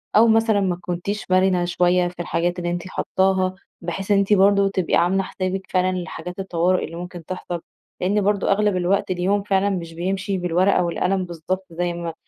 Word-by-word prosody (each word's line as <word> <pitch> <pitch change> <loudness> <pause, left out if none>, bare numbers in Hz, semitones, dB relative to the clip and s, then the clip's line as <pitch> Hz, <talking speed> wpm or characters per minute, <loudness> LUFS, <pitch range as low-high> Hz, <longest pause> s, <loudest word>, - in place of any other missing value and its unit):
أو 225 +2 +7
مثلًا 225 -1 +3
ما 185 -3 0
كنتيش 185 +3 -4
مرنة 185 -1 +3
شويّة 180 0 +2
في 175 0 -10
الحاجات 175 +1 -1
اللي 175 0 -2
أنتِ 175 +1 -4
حاطاها، 190 0 0 0.3
بحيث 185 +4 -4
إن 200 - +5
أنتِ 200 +1 +3
برضو 200 0 +5
تبقي 190 -3 0
عاملة 190 +3 +2
حسابِك 185 0 -3
فعلًا 185 0 +1
لحاجات 180 +1 -6
الطوارئ 180 -1 +1
اللي 165 - -9
ممكن 175 -1 -8
تحصل، 175 -1 -5 0.4
لأن 205 +3 +2
برضو 200 0 +1
أغلب 205 -1 +2
الوقت 185 +2 +1
اليوم 190 +3 +1
فعلًا 200 0 +1
مش 170 -4 -4
بيمشي 190 +3 -2
بالورقة 180 +2 +2
والقلم 180 +2 0
بالضبط 180 +2 -4
زي 175 +1 -2
ما 170 -1 -5
185 Hz, 180 wpm, -22 LUFS, 175-195 Hz, 0.4 s, أو